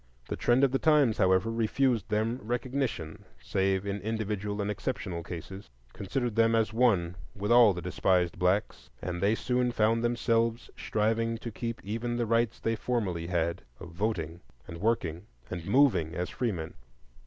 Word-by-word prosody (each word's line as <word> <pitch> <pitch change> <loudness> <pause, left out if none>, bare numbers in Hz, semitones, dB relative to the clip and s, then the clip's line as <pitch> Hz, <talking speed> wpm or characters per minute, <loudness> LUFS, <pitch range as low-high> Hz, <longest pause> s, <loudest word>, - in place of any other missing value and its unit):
The - - -1
trend 120 +3 +2
of 135 - +4
the 135 - +1
times, 150 -8 +3
however, 95 +4 +3
refused 115 0 +1
them 110 +3 0
recognition 120 - -3 0.2
save 95 +9 0
in 100 0 -3
individual 105 -1 -3
and 100 0 -1
exceptional 95 -6 -4
cases, 90 +3 -8 0.2
considered 110 +4 -3
them 115 0 +4
as 110 -1 +1
one 95 -8 +2 0.2
with 105 +2 -2
all 120 -3 +8
the 90 -2 -5
despised 90 -1 +1
blacks, 95 +4 0
and 90 0 -4
they 100 +3 +3
soon 125 +1 0
found 115 0 +2
themselves 115 -1 0
striving 115 +2 0
to 115 +1 -7
keep 115 +1 -5
even 115 +4 -3
the 120 - 0
rights 115 0 +1
they 115 0 0
formerly 100 -9 -2
had 85 -1 -1 0.2
of 85 - -9
voting 85 -3 -3 0.3
and 85 - -8
working 100 -5 -1 0.2
and 85 -2 -5
moving 105 - +3
as 90 +1 -3
freemen. 100 -11 -3
110 Hz, 160 wpm, -29 LUFS, 90-115 Hz, 0.3 s, all